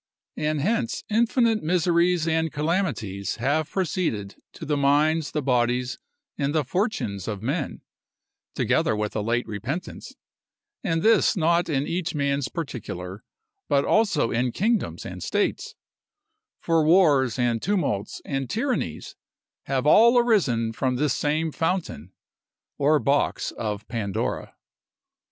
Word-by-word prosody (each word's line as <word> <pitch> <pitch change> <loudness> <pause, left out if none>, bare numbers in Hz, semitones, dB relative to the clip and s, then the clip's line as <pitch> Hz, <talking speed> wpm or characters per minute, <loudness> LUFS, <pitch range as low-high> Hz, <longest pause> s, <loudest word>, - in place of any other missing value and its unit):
And 150 -1 -1
hence 230 - -1
infinite 230 0 +2
miseries 170 0 +2
and 160 -1 +1
calamities 150 - -2
have 145 +6 0
proceeded 160 - -2 0.2
to - - -8
the 150 - 0
minds, 150 +3 +2
the 150 -1 -3
bodies, 125 -1 0 0.4
and 140 +2 0
the 155 - +2
fortunes 130 - -2
of 105 -2 -4
men, 140 +4 -2 0.7
together - - +1
with 105 0 -3
a 110 - 0
late 120 +3 0
repentance; 120 - -6 0.7
and 165 -6 0
this 220 -2 +4
not 170 +1 +2
in 140 -2 0
each 175 0 -3
man's 140 -1 0
particular, 100 - -6 0.5
but 140 0 +3
also 200 - +2
in 120 +2 0
kingdoms 220 - -1
and - - -7
states; - - -1 0.8
for 165 -2 +2
wars, 150 - +4
and 120 -2 +1
tumults, 170 - -1
and 135 -2 -3
tyrannies, 220 - -2 0.5
have 135 -1 -1
all 230 +10 +6
arisen 145 - +2
from 125 +3 -1
this 140 +1 +1
same 155 +2 0
fountain, 160 - -2 0.7
or 150 +2 +4
box 140 +2 0
of 105 -1 -5
Pandora. 110 -4 -3
150 Hz, 125 wpm, -25 LUFS, 120-175 Hz, 0.8 s, all